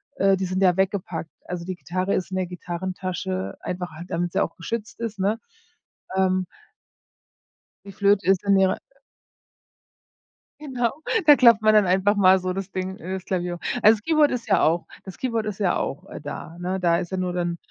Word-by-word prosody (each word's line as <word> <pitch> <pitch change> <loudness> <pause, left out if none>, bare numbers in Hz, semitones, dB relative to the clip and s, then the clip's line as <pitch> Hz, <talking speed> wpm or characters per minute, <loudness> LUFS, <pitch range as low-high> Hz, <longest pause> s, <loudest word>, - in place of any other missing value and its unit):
äh, 195 0 +3
die 190 - -2
sind 185 +1 -1
ja 180 -2 +5
weggepackt. 185 -4 -1 0.2
Also 175 -1 -5
die 185 0 -4
Gitarre 185 +2 -2
ist 185 - -3
in 185 - -2
der 185 - -1
Gitarrentasche, 175 - -4
einfach 180 -2 -4
halt 170 +3 -10
damit 175 +1 -1
sie - - +1
auch - - -5
geschützt 220 +7 -5
ist, 220 -4 -4
ne? 210 +4 +1 0.8
Ähm 185 -1 +2 1.4
Die 200 - -9
Flöte 200 +1 +2
ist 190 -2 +3
in 200 -1 +4
ihrer 190 -1 +3 1.8
Genau, 250 -6 -1 0.3
da 295 -1 +9
klappt 235 -4 +6
man 215 0 +5
dann 210 -2 +5
einfach 190 +3 +3
mal 190 -1 +6
so 185 0 -2
das 195 +1 -5
Ding 185 +1 -4
äh, 185 +3 -6
das 190 -1 -5
Klavier 180 -2 -2
hoch. - - -11 0.2
Also 215 +1 +7
das 210 - -15
Keyword 310 -2 +3
ist 240 -2 -3
ja 200 - +3
auch 165 +2 +2 0.2
das 190 -2 -10
Keyboard 230 -4 -1
ist 210 -1 -5
ja 195 - +2
auch, 135 - -4
äh, - - -8
da, 150 +3 -7
ne? 185 +2 -2
Da 170 -1 +3
ist 175 - -5
ja 190 - -2
nur, 180 -1 -1
dann, 175 -1 -2
185 Hz, 200 wpm, -24 LUFS, 180-200 Hz, 1.8 s, da